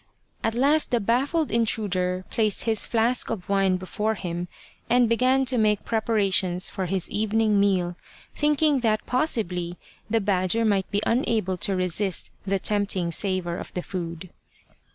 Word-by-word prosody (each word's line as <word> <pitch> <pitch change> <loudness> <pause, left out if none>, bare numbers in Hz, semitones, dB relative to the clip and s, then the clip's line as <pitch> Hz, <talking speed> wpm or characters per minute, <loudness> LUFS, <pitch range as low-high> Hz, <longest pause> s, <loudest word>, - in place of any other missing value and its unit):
At 225 0 0
last 285 +5 +2
the 240 - +1
baffled 270 - 0
intruder 185 -5 -1
placed 215 -3 0
his 220 -2 +1
flask 235 +2 +1
of 195 -6 -5
wine 195 -2 +2
before 210 +4 -2
him 175 -2 -4 0.4
and 245 0 +4
began 255 +3 +2
to 250 -1 +1
make 210 -2 +1
pre 225 - 0
parations 195 -5 +1
for 190 -1 -3
his 185 0 0
evening 215 0 +1
meal, 185 -3 +1 0.4
thinking 295 -1 +2
that 215 -3 0
possibly 180 - -1 0.3
the 225 +1 +2
badger 200 +2 +2
might 200 -3 +1
be 205 +1 -1
unable 225 -6 0
to 195 +2 0
resist 185 +1 -1 0.2
the 195 0 +1
tempting 195 -3 +1
savour 185 -1 0
of - - -8
the 180 - -3
food. 170 -2 -6
205 Hz, 155 wpm, -25 LUFS, 185-230 Hz, 0.4 s, and